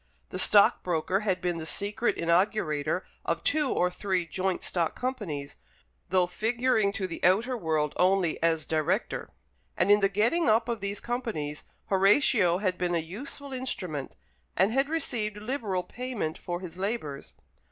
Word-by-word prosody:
The - - -3
stockbroker 185 -3 +4
had 190 -4 -1
been 175 -2 -1
the 160 - -5
secret 205 +7 0
inaugurator 170 -2 +1 0.2
of - - -2
two 295 -2 +1
or 180 0 +1
three 185 -2 -1
joint 185 +2 -2
stock 170 -3 0
companies, 205 - -4 0.5
though 185 -1 +3
figuring 220 +2 +1
to 200 -3 -2
the 170 - -6
outer 220 +8 +3
world 160 -7 0
only 185 -2 +2
as 165 -1 +1
director; 160 +7 -1 0.5
and 200 - +3
in 205 - +7
the 195 -1 +3
getting 230 - +2
up 225 +2 +3
of 235 -2 -2
these 200 0 -3
companies 225 - -4 0.2
Horatio 195 -2 +4
had 185 -2 -1
been 175 -1 0
a - - +3
useful 255 - -6
instrument, 185 - -4 0.4
and 190 +4 +4
had 270 +2 +2
received 230 -10 -1
liberal 210 -5 -2
payment 240 -11 -4
for 175 0 -5
his 180 -1 -8
labours. 190 -9 -4
195 Hz, 150 wpm, -28 LUFS, 175-230 Hz, 0.5 s, in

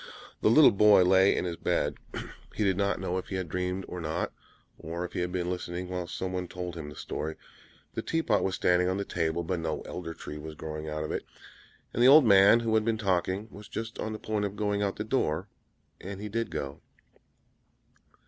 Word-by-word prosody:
The - - +4
little 140 +7 +8
boy 100 -1 +6
lay 95 +1 +5
in - - 0
his 85 -2 -3
bed; - - 0 0.6
he 110 - 0
did 95 -2 +2
not 100 +1 0
know 95 -1 -1
if - - -8
he 95 - -4
had 95 -2 -2
dreamed 90 +3 -2
or 90 - -6
not, 80 +2 -2 0.5
or 85 +3 -4
if - - -9
he - - -2
had 90 0 -1
been 90 -1 -1
listening 90 0 -4
while 90 -1 -3
someone 90 0 -3
told 90 0 -5
him 80 -3 -6
the 75 - -10
story. 80 +3 -4 0.6
The - - -2
tea 165 0 -1
pot - - +2
was 95 -1 0
standing 90 0 +3
on 95 - 0
the 100 - -2
table, 85 0 -1
but 90 +1 -2
no 80 -1 -2
Elder 85 -2 -6
Tree 75 - -8
was 80 +1 -8
growing 75 0 -6
out 75 0 -3
of 75 - -4
it! - - -2 0.7
And 120 - -1
the 125 - +7
old 145 +1 +9
man, 100 +2 +7
who 115 -1 0
had 110 -1 +4
been 115 0 0
talking, 95 0 0
was 105 +1 -11
just 115 +1 -6
on 110 - -2
the 110 - -4
point 110 -1 -2
of 100 0 -4
going 105 -1 0
out 100 -1 0
at - - -24
the 105 - -3
door, 100 - 0 0.5
and 95 +1 -7
he 105 +1 -5
did 115 +2 -2
go. 70 0 -5
95 Hz, 225 wpm, -29 LUFS, 85-105 Hz, 0.7 s, old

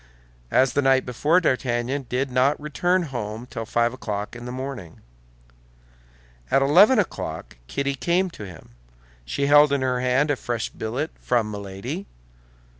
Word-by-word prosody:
As 130 - +3
the 145 - +2
night 135 -1 +3
before, 145 +8 +2
D'Artagnan 130 -3 -1
did 130 +1 -1
not 130 +3 +2
return 175 +5 0
home 120 -5 -5
till 115 -3 -6
five 120 +1 +1
o'clock 105 -4 -5
in 120 0 -8
the 125 - -5
morning. 125 -10 -7 1.5
At 135 - +3
eleven 190 - +6
o'clock 80 - -3
Kitty 140 - -1
came 175 +6 0
to 105 -10 -9
him. 90 -4 -13 0.6
She 140 - -1
held 145 0 +6
in 140 -2 +1
her 125 -1 0
hand 130 +4 +2
a - - +1
fresh 120 -3 -3
billet 125 +8 -3
from 115 -4 0
Milady. 105 - -6
130 Hz, 150 wpm, -24 LUFS, 120-145 Hz, 1.5 s, eleven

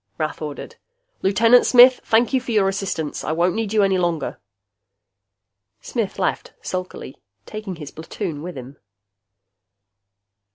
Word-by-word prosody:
Rath 155 0 -3
ordered. 150 -2 -7 0.4
"Lieutenant 230 +5 +5
Smith, 250 +1 +7
thank 235 +3 +2
you 260 - +2
for 245 - -6
your 210 -3 +3
assistance. 195 -6 -3
I 155 - -2
won't 175 +2 +1
need 220 -2 -3
you 215 -2 +3
any 190 -1 +2
longer." 175 -3 -2 1.4
Smith 225 -5 -4
left - - -2
sulkily, 185 -7 -6 0.3
taking 215 -3 -7
his 150 -3 -9
platoon 160 -1 -6
with 175 -1 -7
him. 130 +2 -10
190 Hz, 130 wpm, -21 LUFS, 160-220 Hz, 1.4 s, Smith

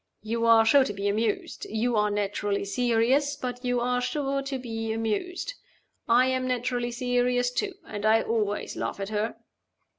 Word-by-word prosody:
You 230 +1 -1
are 225 -1 +7
sure 275 +4 +6
to 205 - -3
be 200 0 -2
amused 215 +1 -1
you 230 +2 0
are 210 0 +3
naturally 205 0 -1
serious 245 +6 +2
but 250 -2 -5
you 245 -1 +1
are 250 +1 +1
sure 275 +1 -1
to 275 0 -3
be 225 -3 -4
amused. 225 - -2 0.6
I 245 +2 +6
am 260 0 0
naturally 245 -1 -1
serious 245 0 +1
too; 395 +10 -2
and 205 -1 -6
I 220 +1 +4
always 210 -3 -1
laugh - - -3
at 195 0 -3
her." 215 +1 -1
240 Hz, 170 wpm, -27 LUFS, 220-250 Hz, 0.6 s, are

